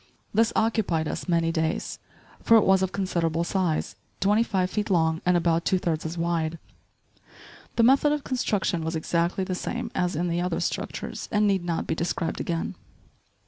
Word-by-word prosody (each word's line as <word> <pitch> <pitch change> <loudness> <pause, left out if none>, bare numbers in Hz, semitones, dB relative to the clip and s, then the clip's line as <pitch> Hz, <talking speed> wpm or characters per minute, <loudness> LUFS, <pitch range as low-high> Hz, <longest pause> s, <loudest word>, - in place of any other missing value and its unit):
This 225 +2 +3
occupied 210 -8 +1
us - - -4
many 165 -1 +2
days; 160 0 -2 0.4
for 230 - +6
it 220 - +4
was 190 0 +4
of 190 -1 0
considerable 170 -4 0
size, 175 -3 -1 0.2
twenty 205 +3 +3
five 190 -5 0
feet 210 0 -2
long 160 -3 +2
and 180 -1 +5
about 170 -1 +1
two 190 - +2
thirds 165 -3 -1
as 165 +2 -6
wide. 165 -1 -1 1.2
The 230 - +3
method 270 +4 +5
of 295 -1 -1
construction 205 -9 -1
was 160 +1 -2
exactly 170 +3 0
the 185 - -3
same 180 - -4
as 180 -2 0
in 175 +3 0
the 170 0 0
other 180 -2 -1
structures - - -4
and 210 -1 +3
need 195 -3 +2
not 170 -1 -2
be - - -1
described 165 0 -2
again. 165 -1 -2
175 Hz, 180 wpm, -26 LUFS, 165-200 Hz, 1.2 s, for